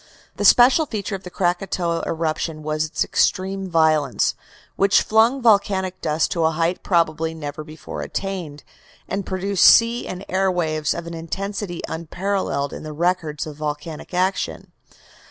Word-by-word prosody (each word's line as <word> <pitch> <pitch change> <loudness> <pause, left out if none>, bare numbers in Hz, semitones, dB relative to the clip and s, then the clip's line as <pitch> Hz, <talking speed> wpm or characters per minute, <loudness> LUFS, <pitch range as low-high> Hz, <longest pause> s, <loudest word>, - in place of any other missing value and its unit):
The 205 - -1
special 255 +9 +6
feature 210 -3 -4
of 195 - -4
the 180 - -9
Krakatoa 175 -1 -1
eruption 160 -1 -2
was 155 +1 -1
its 155 0 -1
extreme 190 0 0
violence, 155 -5 +2 0.4
which 195 0 +4
flung 230 +4 +3
volcanic 195 -4 +2
dust 155 +1 0
to 170 - 0
a - - +4
height 165 +2 -1
probably 165 -2 0
never 150 -1 -6
before 155 +1 -8
attained, 180 -7 -5 0.4
and 195 -1 -3
produced 190 0 0
sea 235 +1 +6
and 185 +2 -6
air 190 +1 +1
waves 155 -4 -1
of 170 - -5
an 170 - -7
intensity 185 +2 -5
unparalleled 165 -3 -2
in - - -7
the 155 -1 -7
records 160 -2 -1
of 150 -2 -9
volcanic 150 +1 -5
action. 185 +2 -1
175 Hz, 150 wpm, -22 LUFS, 155-195 Hz, 0.4 s, special